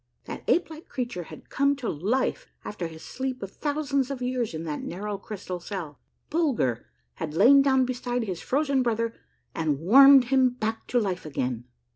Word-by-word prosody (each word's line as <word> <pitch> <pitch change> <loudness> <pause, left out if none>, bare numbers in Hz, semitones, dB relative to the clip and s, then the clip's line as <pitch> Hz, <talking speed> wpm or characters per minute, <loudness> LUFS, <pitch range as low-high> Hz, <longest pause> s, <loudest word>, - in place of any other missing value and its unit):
That - - -7
ape 340 -2 +2
like 315 +1 -11
creature 240 -9 -4
had - - -13
come 280 +1 +2
to 255 -4 -5
life 255 - -1 0.2
after 185 -5 -4
his 160 -1 -11
sleep 260 -3 -4
of 195 - -6
thousands 285 -2 -1
of 275 -2 -4
years 250 -6 -2
in 155 - -4
that 155 -3 -4
narrow, 200 +3 -5
crystal 195 -4 -6
cell! 170 -6 -6 0.3
Bulger 265 - 0 0.3
had 155 -1 -5
lain 265 +10 +7
down 265 -2 +3
beside 245 -1 -2
his 185 -5 -4
frozen 280 -1 +1
brother 230 -1 0 0.4
and 155 -3 0
warmed 270 - +8
him 260 -1 +5
back 225 -2 -3
to 245 - +2
life 190 -5 -2
again 125 -5 -3
235 Hz, 175 wpm, -26 LUFS, 180-270 Hz, 0.4 s, warmed